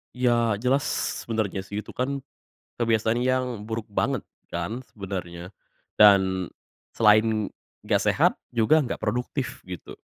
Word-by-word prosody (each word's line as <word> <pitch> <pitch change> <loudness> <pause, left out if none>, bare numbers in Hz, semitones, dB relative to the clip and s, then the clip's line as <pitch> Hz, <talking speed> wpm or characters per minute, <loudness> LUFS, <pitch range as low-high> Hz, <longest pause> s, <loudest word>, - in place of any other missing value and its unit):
Iya 120 -4 +2
jelas 130 +4 +2 0.4
sebenarnya 110 -4 -2
sih 100 +2 -5
itu 105 - -8
kan, 140 +2 -1 0.6
kebiasaan 115 +1 +2
yang 125 -3 0
buruk 110 +1 -4
banget 125 +5 -1 0.2
kan 100 +9 -3
sebenarnya, 90 -2 -6 0.4
dan, 95 -3 +5 0.5
selain 110 -1 +4 0.4
nggak - - +2
sehat - - +3 0.2
juga 120 +7 +4
gak 125 - -3
produktif 125 +5 -3
gitu, 90 -3 -8
110 Hz, 120 wpm, -25 LUFS, 100-125 Hz, 0.6 s, dan